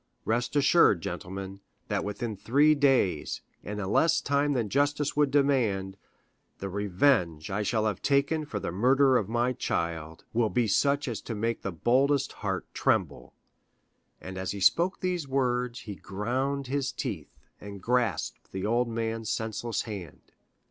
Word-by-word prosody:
Rest 120 +4 -1
assured, 145 - +5
gentlemen, 95 +2 -6 0.3
that - - -1
within 105 +2 -4
three 140 +9 +4
days, 135 - +1 0.2
in 105 0 -5
a 95 - -3
less 160 +11 +3
time 140 +1 +1
than 120 -5 0
justice 145 +4 0
would 145 -1 +3
demand, 120 -10 +1 0.6
the 100 - -5
revenge 95 - +1
I 100 +2 -1
shall 110 +1 0
have 105 -4 -1
taken 140 +3 +2
for 105 -7 -4
the 85 - -4
murder 130 +7 +4
of 105 -5 +1
my 120 +2 +1
child 80 -7 -3
will 115 -1 +2
be 120 0 +1
such 140 +7 +2
as 120 -3 -3
to 115 - -5
make 115 +2 -1
the 95 - -3
boldest 130 - +2
heart - - -2
tremble;" - - 0 0.8
and 95 0 -7
as 95 +1 -3
he 100 - -6
spoke 170 - +3
these 180 -5 -1
words 125 -2 0
he 105 - -7
ground 130 +9 -2
his 135 0 -1
teeth, - - -5 0.2
and 100 -1 -9
grasped 115 -4 -1
the 95 +1 -4
old 120 +3 +2
man's 115 -1 -3
senseless 110 +1 -2
hand. 100 - -9
115 Hz, 155 wpm, -28 LUFS, 100-140 Hz, 0.8 s, assured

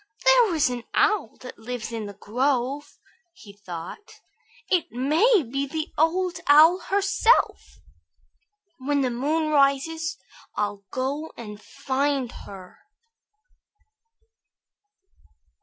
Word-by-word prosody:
"There - - +5
is 310 - +3
an 245 -1 -5
owl 405 - +1
that 255 - -10
lives 235 0 -6
in 225 -2 -5
the 200 - -10
grove," 260 +6 -2 0.4
he 215 - -15
thought. 180 - -9 0.5
"It 360 -4 +1
may 315 - +3
be 275 +3 -3
the 315 +2 -4
Old 350 +3 +1
Owl 315 +5 +7
herself. 400 +5 +1 1.0
When 285 +2 0
the 255 -2 0
moon 305 +6 -1
rises, 305 +4 +1 0.4
I'll 205 -1 -3
go 280 +5 -3
and 210 -3 -9
find 270 -1 -2 0.2
her." 185 -2 -12
280 Hz, 105 wpm, -24 LUFS, 235-325 Hz, 1.0 s, Owl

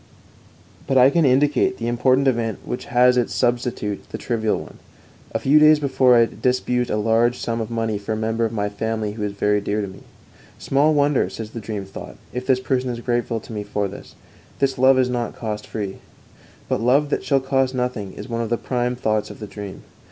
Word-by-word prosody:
But 135 - +2
I 130 +2 +7
can 165 -1 +3
indicate 145 +8 +3
the 115 - -4
important 130 +3 +2
event 115 -5 0
which 125 - -5
has 125 +1 +4
as 120 - +2
its - - -8
substitute 120 -4 -1
the - - -5
trivial 110 -3 -1
one. - - -11 0.5
A - - 0
few 145 +3 +4
days 155 0 +7
before 130 -3 +4
I 120 - +6
had 115 - -1
disbursed 125 -1 +1
a - - 0
large 115 +3 +2
sum 115 0 -2
of 110 - -4
money 115 -3 -1
for 105 +2 -3
a - - -2
member 110 +1 -1
of 115 - 0
my 105 -2 -1
family 110 +1 -3
who 105 +1 -8
is 105 -1 -2
very 105 +1 +1
dear 105 +1 -1
to 100 - -2
me. 95 - -11 0.6
Small 145 +3 +2
wonder, 145 -1 +2
says 110 -1 -7
the 115 - -6
dream 105 -2 -5
thought, 95 - -10 0.2
if 125 0 -5
this 130 -2 +3
person 130 0 -1
is 120 -1 -4
grateful 120 -1 -1
to 115 - -10
me 105 - -3
for 100 0 -2
this 100 - -11 0.4
this 135 -2 0
love 130 +1 +6
is 130 -1 +3
not 120 -1 -3
cost 105 -2 -5
free. 100 -3 -4 0.7
But - - -1
love 140 +5 +3
that - - 0
shall 140 -2 +2
cost 135 -1 0
nothing 125 -6 -2
is - - -8
one 115 -1 -2
of 115 - -3
the 120 - +1
prime 125 0 -1
thoughts 110 -3 -1
of - - -10
the 105 - -6
dream. 100 -2 -8
120 Hz, 225 wpm, -22 LUFS, 110-130 Hz, 0.7 s, I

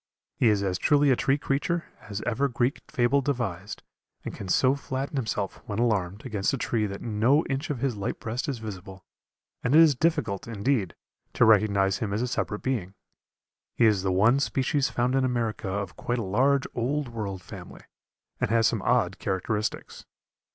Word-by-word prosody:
He - - +2
is 105 -2 +2
as 95 -2 -1
truly 145 -1 +4
a - - +5
tree 135 +2 +1
creature 165 +5 -1 0.2
as 105 0 -4
ever 130 +4 +1
Greek 125 +1 -1
fable 125 +3 +2
devised, 115 -8 -3 0.4
and - - -4
can 100 - -7
so 130 +7 +3
flatten 135 0 -4
himself, 110 -6 -2
when 105 - -4
alarmed, 105 -4 0
against 105 -4 -1
a - - -5
tree 110 -3 0
that 100 0 -7
no 120 +7 +2
inch 135 +3 -3
of 135 -5 -3
his 130 -4 0
light 100 -1 -4
breast 120 +5 -3
is 135 - -2
visible, 95 -3 -9 0.6
and 125 +4 +2
it - - +9
is 160 -3 +7
difficult, 135 - 0
indeed, 115 -3 -1 0.4
to - - +4
recognize 100 -3 +3
him 105 -3 -2
as 110 +4 0
a - - -1
separate 105 -3 -3
being. 105 -8 -2 0.8
He 120 - +4
is 105 -4 +4
the 95 0 0
one 110 +8 +4
species 140 0 0
found 125 +1 0
in 135 0 +2
America 120 -5 -1
of 100 +1 -3
quite 120 - -2
a 115 - -2
large 130 +8 +2
Old 135 +4 -1
World 100 -5 -5
family, - - -10 0.6
and - - 0
has 115 0 +3
some 115 -4 +1
odd 100 -5 +1
characteristics. 100 +3 -3
115 Hz, 185 wpm, -26 LUFS, 100-135 Hz, 0.8 s, it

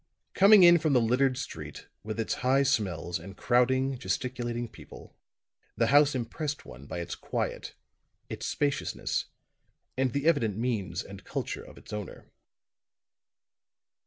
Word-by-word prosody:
Coming 200 0 +7
in 175 0 +8
from 155 -2 +1
the 125 - +5
littered 125 +3 +2
street, - - -7 0.2
with 110 +1 -5
its 115 - 0
high 130 +2 +3
smells 95 - -1
and 95 +4 -11
crowding, 130 +2 +2
gesticulating 120 -2 -3
people, - - -14 0.6
the - - +3
house 145 -1 +6
impressed 140 +5 -4
one 65 +3 -12
by 85 - -5
its 85 - -5
quiet, - - -4 0.5
its - - -5
spaciousness, 145 -1 -1 0.7
and 130 -1 +1
the 140 +1 -1
evident 115 - +2
means 110 -7 -2
and 100 -1 -11
culture - - -4
of - - -14
its - - -12
owner. 105 -3 -6
125 Hz, 135 wpm, -29 LUFS, 105-140 Hz, 0.7 s, in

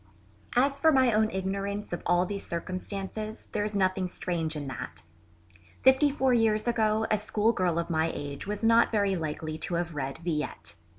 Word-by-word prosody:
As 275 +3 +3
for 320 +2 +5
my 260 -4 +4
own 215 0 +3
ignorance 200 +1 -3
of 175 - -3
all 175 +1 +3
these 200 +1 -4
circumstances 195 +5 -5
there 210 - 0
is 210 0 -3
nothing 185 -1 +1
strange 170 -3 -3
in 145 -1 -4
that. 80 -10 -7 0.8
Fifty 265 +3 +5
four 265 -2 +2
years 220 -1 +2
ago 220 -2 +2
a 215 - +3
schoolgirl 210 -5 +1
of 170 +1 -1
my 160 0 +2
age 140 +4 -6
was 210 +1 -3
not 230 +1 +5
very 200 -3 +2
likely 155 -1 -4
to 180 - -1
have 170 -1 -2
read 135 -2 -3
Villette. 150 - -3
195 Hz, 175 wpm, -28 LUFS, 170-220 Hz, 0.8 s, for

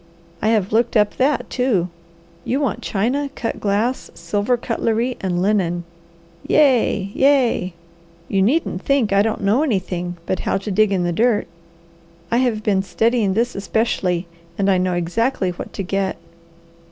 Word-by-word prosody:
I - - +1
have 215 -3 +1
looked 230 +1 +2
up 210 -1 +2
that, 275 +2 +1
too. 225 -9 0 0.5
You 265 - -1
want 275 -6 -1
china, 255 +8 -1
cut 230 - -3
glass, 215 +5 -1
silver 210 +4 0
cutlery, 230 +1 -1
and 180 -2 -1
linen. 180 -4 +1 0.6
Ye! 240 -9 +3
Ye! 255 -10 +2 0.5
You 195 - +1
needn't 225 - +1
think 255 -7 +1
I 200 - +5
don't 215 0 -1
know 210 +7 +3
anything 180 - -2
but 190 - -1
how - - 0
to 200 +2 -5
dig 210 +1 +3
in 185 -2 +1
the 175 - 0
dirt. 225 +3 +2 0.9
I 235 - +3
have 240 -4 +1
been 200 -3 +2
studying 200 +2 +1
this 235 +2 +1
especially, 195 -3 -1 0.3
and 195 0 +2
I 185 - +3
know 180 -1 0
exactly 185 +3 0
what 175 - -8
to 195 - -4
get." 195 +1 -1
210 Hz, 155 wpm, -20 LUFS, 190-240 Hz, 0.9 s, I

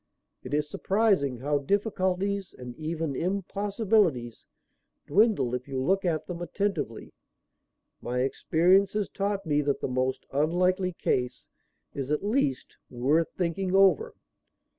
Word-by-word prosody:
It 130 +3 -3
is 150 0 0
surprising 190 - +1
how 145 +1 +1
difficulties, 195 +2 -1
and 125 -1 -8
even 160 -2 -3
impossibilities, 195 - 0 0.6
dwindle 205 - +3
if 125 +1 -3
you 135 -2 -3
look 190 +9 +1
at 160 -3 0
them 175 -1 -6
attentively. 175 - -3 0.9
My 125 +1 -2
experience 180 +8 +3
has 210 -1 -1
taught 200 0 -2
me 150 -1 +2
that 145 -1 0
the - - -2
most 130 0 -1
unlikely 180 +5 +1
case 125 -5 -1 0.5
is, 135 -1 -4
at 150 +5 0
least, 205 - -1
worth 140 +7 +1
thinking 185 +1 -1
over." 195 - +4
170 Hz, 125 wpm, -27 LUFS, 135-195 Hz, 0.9 s, over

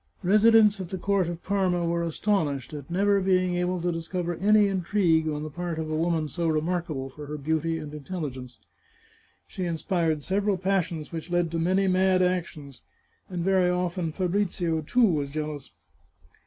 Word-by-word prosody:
Residents 215 +1 +5
at 180 - -6
the 190 - -4
court 195 -1 +1
of 175 0 -7
Parma 185 -3 0
were 170 0 0
astonished 160 - -1
at 145 -1 -8
never 200 +3 +2
being 185 -1 +2
able 180 +1 -1
to 175 +1 0
discover 175 +1 -3
any 210 +2 +4
intrigue 180 -4 +1
on 150 0 -3
the 155 - -5
part 175 +1 -4
of 155 -1 -3
a - - 0
woman 165 -1 0
so 170 +2 -2
remarkable 155 -3 -1
for 150 +1 -7
beauty 160 +3 -1
and 150 -2 -7
intelligence. 140 -6 -6 0.9
She 185 - -5
inspired 165 -2 -1
sev 195 +4 -1
eral 200 -3 +1
passions 180 -4 -1
which 165 +1 -6
led 175 -2 0
to 165 - -1
many 190 +4 +2
mad 185 0 +3
actions, 165 -7 -3 0.5
and 175 -2 -3
very 190 -1 +3
often 180 -2 -1
Fabrizio, 180 -2 -1
too, 240 +11 +3
was 150 -8 0
jealous. 150 -1 -5
175 Hz, 170 wpm, -26 LUFS, 155-185 Hz, 0.9 s, Residents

